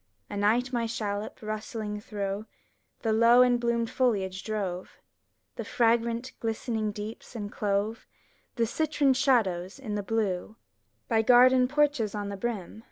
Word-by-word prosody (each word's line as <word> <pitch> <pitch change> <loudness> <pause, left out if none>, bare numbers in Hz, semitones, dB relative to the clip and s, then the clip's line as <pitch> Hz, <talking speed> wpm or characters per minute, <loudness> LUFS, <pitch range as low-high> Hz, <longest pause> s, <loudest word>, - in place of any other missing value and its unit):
Anight 225 +6 +1
my 235 -1 0
shallop, 210 -2 -3
rustling 215 -1 -4
through 205 0 -4 0.6
The 225 -2 +1
low 230 +3 +6
and 245 -1 +3
bloomed 235 -1 0
foliage, 195 -7 0
drove 195 -4 -4 0.6
The - - -3
fragrant, 235 +1 +1
glistening 225 -1 -2
deeps, 210 +4 -8
and 205 -2 -5
clove 205 +2 -1 0.5
The 235 -2 +2
citron 290 +2 +1
shadows 215 -9 +1
in 245 -6 -6
the 205 - -1
blue: 210 -1 -2 0.5
By 225 -2 +3
garden 250 +2 +6
porches 285 -6 +1
on 205 -1 -3
the 200 - -5
brim. 215 -2 -4
225 Hz, 135 wpm, -28 LUFS, 205-240 Hz, 0.6 s, low